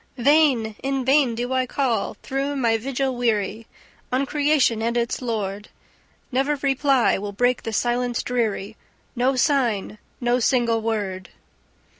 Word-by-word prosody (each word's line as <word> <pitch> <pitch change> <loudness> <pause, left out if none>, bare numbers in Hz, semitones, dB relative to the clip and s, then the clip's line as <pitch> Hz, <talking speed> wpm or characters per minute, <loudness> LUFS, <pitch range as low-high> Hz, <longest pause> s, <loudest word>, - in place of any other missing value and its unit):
"Vain! 260 -4 +3
In 270 -1 -2
vain 265 -3 +3
do 245 +2 -3
I 255 -1 +1
call, 245 -6 -1
through 275 +1 -2
my 235 -4 +2
vigil 265 +3 -2
weary, 225 -2 -1 0.4
On 260 +2 +1
creation 285 -6 +2
and 235 +1 0
its 235 +2 -1
Lord! 210 -4 -3 0.6
Never 270 +4 +1
reply 275 -4 +2
will 200 0 -5
break 245 +4 +1
the 225 - -5
silence 240 +2 0
dreary! 220 -4 -2 0.4
No 255 +2 +1
sign! 240 -7 0 0.2
No 245 0 +1
single 235 -2 +2
word!" 205 -5 -3
245 Hz, 135 wpm, -23 LUFS, 225-270 Hz, 0.6 s, Vain